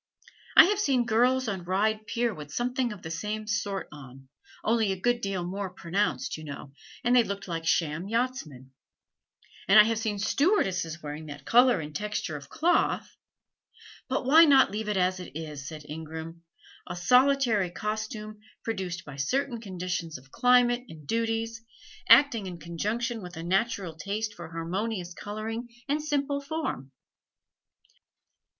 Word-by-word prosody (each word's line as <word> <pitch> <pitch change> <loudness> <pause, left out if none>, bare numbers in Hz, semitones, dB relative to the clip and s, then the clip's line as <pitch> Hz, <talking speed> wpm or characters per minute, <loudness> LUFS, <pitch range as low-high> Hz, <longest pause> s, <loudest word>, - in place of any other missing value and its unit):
I - - +13
have 410 +2 +1
seen 265 -11 +2
girls 245 +3 +2
on 190 -4 -3
Ryde 215 +4 0
Pier 235 -1 0
with 150 -4 -9
something 250 0 -1
of 205 -4 -9
the 160 - -6
same 210 +5 -3
sort 205 -2 -2
on, 135 -2 -13 0.3
only 220 -2 +2
a 190 - -3
good 240 +4 +1
deal 195 -3 -2
more 190 +2 -4
pronounced, 175 -5 -2
you 155 - -9
know, 145 -2 -8 0.3
and 245 0 +3
they 245 - +7
looked 200 -2 -5
like 165 -2 -4
sham 165 +2 +1
yachtsmen; 210 - -3 1.0
and 195 +2 +8
I - - +11
have 225 0 0
seen 220 -2 -2
stewardesses 190 - +1
wearing 150 +1 -6
that 145 -1 -9
color 245 -4 +5
and 150 -1 -7
texture 210 -6 -3
of 140 -1 -9
cloth 345 +3 +1 0.4
" - - -21
"But 260 0 -1
why 315 +5 +8
not 275 -3 +6
leave 210 +1 -3
it 210 - 0
as 185 0 +1
it 180 - -9
is," 150 -3 -7
said 155 -2 -8
Ingram 160 +2 -7 0.4
"a - - -5
solitary 250 0 +3
costume 215 +2 -5 0.2
produced 185 -6 -4
by 145 -2 -9
certain 240 - -1
conditions 180 - -4
of 135 +1 -19
climate 245 -1 +4
and 155 -2 -12
duties, 225 +2 -1 0.5
acting 235 -9 +6
in 180 -2 -6
conjunction 215 +8 -3
with 180 -2 -9
a 165 - -5
natural 190 -1 0
taste 210 +5 -3
for 170 -4 -9
harmonious 180 +3 -3
coloring 220 +5 -5 0.2
and 295 +2 0
simple 285 -2 -1
form? 280 - -4
205 Hz, 155 wpm, -28 LUFS, 165-235 Hz, 1.0 s, I